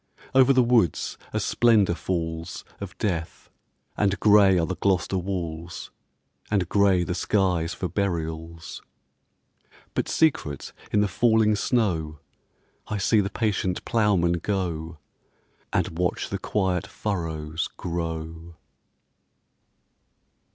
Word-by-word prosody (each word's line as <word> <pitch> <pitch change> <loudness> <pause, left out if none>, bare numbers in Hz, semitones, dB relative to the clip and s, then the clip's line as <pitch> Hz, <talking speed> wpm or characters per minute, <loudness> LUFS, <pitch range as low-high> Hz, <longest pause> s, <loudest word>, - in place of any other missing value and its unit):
Over 130 0 +6
the 130 -2 +5
woods 115 -7 +2 0.2
a - - -1
splendour 110 -7 +3
falls 80 0 -4
Of 100 0 -8
death, 85 -6 -3 0.4
and 100 -2 +1
grey 100 -3 +6
are 85 - +2
the 95 - -3
Gloucester 95 -1 +1
walls, 85 -2 -5 0.6
And 100 -5 +1
grey 100 -3 +3
the 90 - -2
skies 90 -3 0
for 90 - -3
burials. 85 -4 -4 1.1
But - - -1
secret 80 - 0 0.2
in 105 - +3
the 105 - +2
falling 110 +1 +3
snow 90 -10 0 0.7
I 105 - -2
see 105 +2 +3
the 100 - -2
patient 100 -5 -1
ploughman 95 -6 +2
go, 85 -4 -3 0.7
And 80 - -1
watch 90 0 -1
the - - -3
quiet 95 -4 -1
furrows 80 -5 -3
grow. 80 -1 -5
90 Hz, 110 wpm, -25 LUFS, 85-105 Hz, 1.1 s, Over